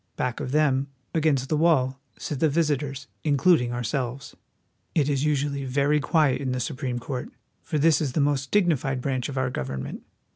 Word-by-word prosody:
Back 125 -2 -2
of 130 - -4
them, 140 -2 +2 0.3
against 150 -5 +2
the 155 - +1
wall, 140 -5 +2 0.2
sit 145 - -4
the 160 - +3
visitors, 145 -3 0 0.2
including 145 -3 +3
ourselves. 120 +2 -3 0.6
It 150 -4 +3
is 140 0 +1
usually 140 -1 0
very 140 +3 +2
quiet 145 -1 +2
in 130 -2 -1
the 125 - -2
Supreme 130 -2 -3
Court, 125 +1 -5 0.3
for 155 +1 -3
this 160 +2 +4
is 140 -5 -1
the - - 0
most 140 -1 +1
dignified 150 -9 +2
branch 130 -1 -2
of 135 - -5
our 130 -1 0
government. 65 - -4
140 Hz, 175 wpm, -25 LUFS, 130-150 Hz, 0.6 s, this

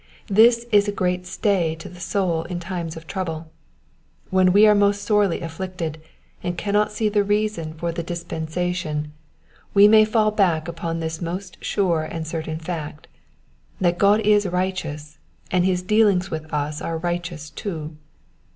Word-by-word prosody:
This 230 +3 +5
is 205 -1 +5
a - - +1
great 180 -2 -1
stay 180 -5 0
to 160 - -10
the 180 - -12
soul 175 -3 -1
in 175 0 -4
time 175 -1 -4
of 160 0 -8
trouble. 165 -4 -5 0.8
"When 185 -1 +4
wo 200 +3 +5
are 210 - +7
most 205 0 +2
sorely 205 -5 +2
afflicted, 165 -1 -5 0.4
and 175 0 -3
cannot 210 +1 +1
see 215 +1 0
the 205 -1 +2
reason 205 -6 -1
for 170 +1 -2
the 170 - -4
dispensation, 165 -2 -3 0.6
we 200 +1 +8
may 215 0 +7
fall 215 0 +2
back 175 -6 +1
upon 165 0 -4
this 160 +1 -4
most 180 +2 -6
sure 175 -5 +1
and 160 +1 -5
certain 160 0 -4
fact, 160 -2 -6 0.7
that 175 -2 +1
God 205 +2 +5
is 210 -1 +3
righteous, 175 -5 -3 0.3
and 180 -2 +2
his 180 -1 +1
dealings 200 -2 +3
with 155 0 -5
us 150 0 -2
are 165 - -3
righteous 170 -2 -4
too. 160 -6 -5
180 Hz, 160 wpm, -22 LUFS, 160-200 Hz, 0.8 s, we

